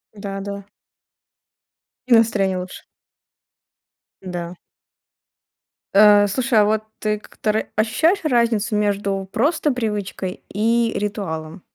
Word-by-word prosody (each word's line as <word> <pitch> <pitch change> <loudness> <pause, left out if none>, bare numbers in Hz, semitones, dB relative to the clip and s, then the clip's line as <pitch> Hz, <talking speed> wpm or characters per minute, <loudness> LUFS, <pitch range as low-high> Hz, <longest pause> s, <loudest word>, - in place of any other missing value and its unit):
Да-да. 200 0 -6 1.4
И 250 - +4
настроение 215 -5 +3
лучше. 180 0 -8 1.4
Да. 175 -1 -6 1.4
Э, 205 0 +7
слушай, 235 +2 +1
а 210 - +5
вот 215 +1 +1 0.2
ты 210 -1 -1
к - - -19
тр 215 0 0
ощущаешь 315 - +2
разницу 235 -6 +1
между 200 -2 -1
просто 295 +5 +1
привычкой 205 -6 -4
и 230 +3 +1
ритуалом? 185 -5 -4
210 Hz, 95 wpm, -21 LUFS, 195-225 Hz, 1.4 s, Э